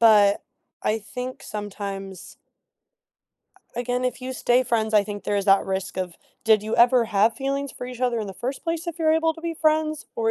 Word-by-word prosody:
but, 210 -3 +6 0.4
I 220 +1 +1
think 250 +4 -6
sometimes 195 -3 -6 1.4
a 240 - -2
again, 250 +1 -1
if 255 0 -2
you 260 +1 -4
stay 250 0 +3
friends, 220 -2 0
I 210 - +6
think 205 0 -7
there 205 - 0
is 200 -1 +1
that 195 -1 +5
risk 190 -1 -3
of 185 -2 -3 0.3
"Did 220 -2 +5
you 220 - -2
ever 240 -1 +5
have 215 +2 +3
feelings 275 0 -2
for - - -7
each 250 -1 -7
other 245 -2 +1
in 210 - -4
the - - -5
first 255 +8 -4
place 335 +1 -2
if 340 - -4
you're 315 -2 +3
able 320 0 +2
to 325 - -11
be 335 0 -3
friends?" 310 -1 +1
Or 225 -1 +1
235 Hz, 210 wpm, -24 LUFS, 205-270 Hz, 1.4 s, but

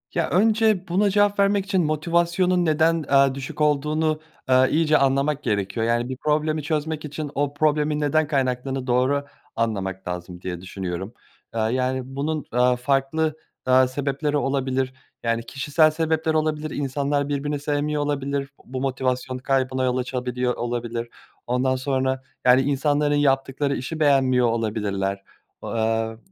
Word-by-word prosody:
Ya, 170 - +1
önce 215 -1 +3
buna 195 +4 +2
cevap 205 0 +2
vermek 200 0 +3
için 190 -3 +1
motivasyonun 170 +3 +1
neden, 160 +1 +2
eee, 135 -1 +5
düşük 140 +2 -6
olduğunu, 150 +1 +1 0.3
eee, 130 0 +5
iyice 155 -1 +3
anlamak 140 +2 +1
gerekiyor. 105 +2 -1
Yani, 120 +2 0
bir 130 - -4
problemi 155 +1 0
çözmek 155 +1 -2
için 150 0 -5
o 145 0 0
problemin 150 0 +1
neden 150 +1 +2
kaynaklandığını 130 -2 -1
doğru 130 +3 +2 0.3
anlamak 95 -5 -2
lazım 90 0 -6
diye 90 -2 -5
düşünüyorum. 95 +2 -5 0.4
Eee, - - 0
yani, 130 +3 0
bunun, 145 +3 -3
eee, 125 +1 +4
farklı, 140 +5 0 0.3
eee, 130 0 +5
sebepleri 140 +3 -1
olabilir, 135 -2 -1 0.3
yani, 115 0 0
kişisel 150 +4 +2
sebepler 160 0 0
olabilir, 155 0 0
insanlar 140 +1 -1
birbirini 145 +1 -2
sevmiyor 145 +1 -1
olabilir, 140 -1 -2 0.2
bu 130 0 -5
motivasyon 130 -1 -1
kaybına 130 0 0
yol 125 0 +1
açabiliyor 125 -1 -2
olabilir. 120 -1 -3 0.4
Ondan 130 +1 +1
sonra, 130 0 -1 0.2
yani, 125 +1 +6
insanların 145 +1 +1
yaptıkları 140 0 +1
işi 155 +6 -5
beğenmiyor 130 -4 +4
olabilirler, 100 -4 -1 0.4
eee, 110 0 -1
135 Hz, 135 wpm, -23 LUFS, 125-150 Hz, 0.4 s, yani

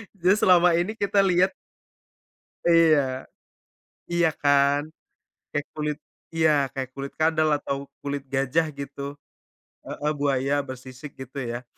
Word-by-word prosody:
Jadi, 185 0 +3
selama 180 -2 +5
ini 210 +6 -2
kita 200 -1 +1
lihat 185 -1 +3 1.1
Iya. 155 -6 +4 0.9
Iya, 170 -1 +3
kan? 140 0 +4 0.7
Kayak 145 -1 -2
kulit 150 -1 -2 0.4
iya, 160 -1 +3 0.2
kayak 130 -1 -4
kulit 140 0 -6
kadal, 155 0 +2
atau 140 - -3 0.3
kulit 140 0 -3
gajah, 135 +5 +2
gitu. 140 0 -7 0.7
Heeh. 150 +1 -2
Buaya 140 -1 +1
bersisik, 130 +2 -9
gitu, 130 +1 -9
ya? 120 0 -5
145 Hz, 115 wpm, -25 LUFS, 135-165 Hz, 1.1 s, selama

